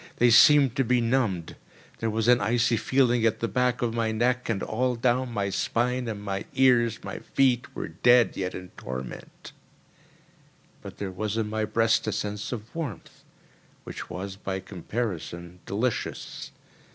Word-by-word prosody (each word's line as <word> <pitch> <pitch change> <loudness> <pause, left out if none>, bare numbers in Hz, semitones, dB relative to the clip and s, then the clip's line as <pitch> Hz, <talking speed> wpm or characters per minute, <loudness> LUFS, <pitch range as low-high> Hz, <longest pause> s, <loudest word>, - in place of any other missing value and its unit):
They 120 0 +4
seemed 135 +1 +7
to 135 - +3
be 125 0 +2
numbed. 115 -8 0 0.4
There 115 - -1
was 110 +1 -1
an 125 0 +5
icy 120 0 +2
feeling 120 0 +2
at 115 -1 +2
the 115 - -1
back 125 +3 0
of 115 -2 0
my 115 -1 0
neck 125 +3 0
and 100 -4 -1
all 125 +3 0
down 125 +1 +1
my 100 -3 -2
spine, 125 +4 0
and 105 -2 -5
my 100 -1 -3
ears, 125 -4 +4
like - - -19
my - - -5
feet, 130 -3 +1
were - - -4
dead, 120 +8 +4
yet 95 -1 -3
in 90 0 -8
torment; 65 -3 -8 1.3
but - - -10
there 100 -2 -4
was 105 +3 -3
in 110 -2 0
my 110 0 0
breast 115 +1 +1
a - - +1
sense 105 0 -4
of 115 -2 -7
warmth 145 - -7 0.6
which - - -8
was, 95 +2 -6
by 95 -1 -4
comparison, 90 -3 -5
delicious. 115 +4 -3
115 Hz, 165 wpm, -26 LUFS, 100-125 Hz, 1.3 s, seemed